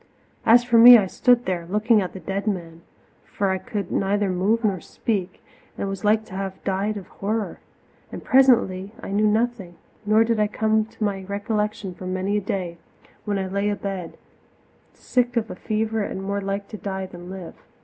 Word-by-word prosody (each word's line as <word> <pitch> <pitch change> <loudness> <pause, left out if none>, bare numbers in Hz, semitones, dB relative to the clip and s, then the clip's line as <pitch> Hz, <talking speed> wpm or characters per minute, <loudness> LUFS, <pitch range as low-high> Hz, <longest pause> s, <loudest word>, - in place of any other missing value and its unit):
As 240 +2 +7
for 240 -1 +4
me, 245 +1 +11
I 205 - +2
stood 245 +5 +2
there 175 -2 -2
looking 210 +3 +3
at 185 - -4
the 190 - -7
dead 195 +4 -4
man, 170 -5 -3 0.4
for 200 -1 -2
I 190 - -1
could 205 -4 -5
neither 200 0 +1
move 205 +6 +1
nor 195 -5 0
speak 195 -2 -3 0.3
and 200 - -2
was 195 +1 -5
like 215 +1 +2
to 190 - -13
have 190 0 -5
died 200 +2 -1
of 195 - -8
horror. 215 +2 -3 0.5
And - - -7
presently 230 -7 +3
I - - -8
knew 210 +2 +2
nothing, 215 -4 -1 0.3
nor 215 +1 +4
did 225 -1 0
I 210 - +3
come 220 +1 +1
to 220 - -8
my 195 -2 -1
recollection 205 -1 -2
for 185 +1 -8
many 185 +2 -1
a - - -1
day, 180 -3 -4 0.5
when 205 -1 -1
I 190 - -2
lay 200 +2 -1
abed, 195 -4 -4 0.8
sick 245 -1 0
of 225 -1 -1
a - - -6
fever 220 +2 -1
and 195 -1 -4
more 200 +1 -2
like 200 +1 -3
to 215 - -7
die 190 0 -4
than 175 -1 -11
live. 185 -2 -8
200 Hz, 190 wpm, -23 LUFS, 190-220 Hz, 0.8 s, me